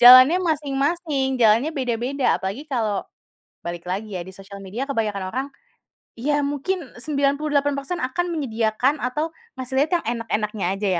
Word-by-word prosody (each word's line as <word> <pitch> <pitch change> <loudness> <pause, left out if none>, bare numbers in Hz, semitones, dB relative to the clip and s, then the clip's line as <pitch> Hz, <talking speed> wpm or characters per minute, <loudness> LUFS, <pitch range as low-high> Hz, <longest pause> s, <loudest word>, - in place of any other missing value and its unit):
jalannya 255 +7 +10
masing-masing, 285 -2 0
jalannya 230 +6 +5
beda-beda, 255 +1 +1
apalagi 200 +10 -3
kalau 220 -6 0 0.6
balik 175 0 -4
lagi 200 +3 -3
ya - - -3
di 190 - -8
sosial 195 +1 -10
media 220 +8 -4
kebanyakan 210 -7 -1
orang, 260 +3 -1 0.7
ya 290 +4 +1
mungkin 290 +2 -2
98% 285 +2 0
akan 260 +8 0
menyediakan 245 -1 +1
atau 300 +6 0 0.3
ngasih 260 +1 -4
lihat 315 - -16
yang - - -22
enak-enaknya 210 -3 -2
saja 205 0 -1
260 Hz, 135 wpm, -23 LUFS, 220-290 Hz, 0.7 s, jalannya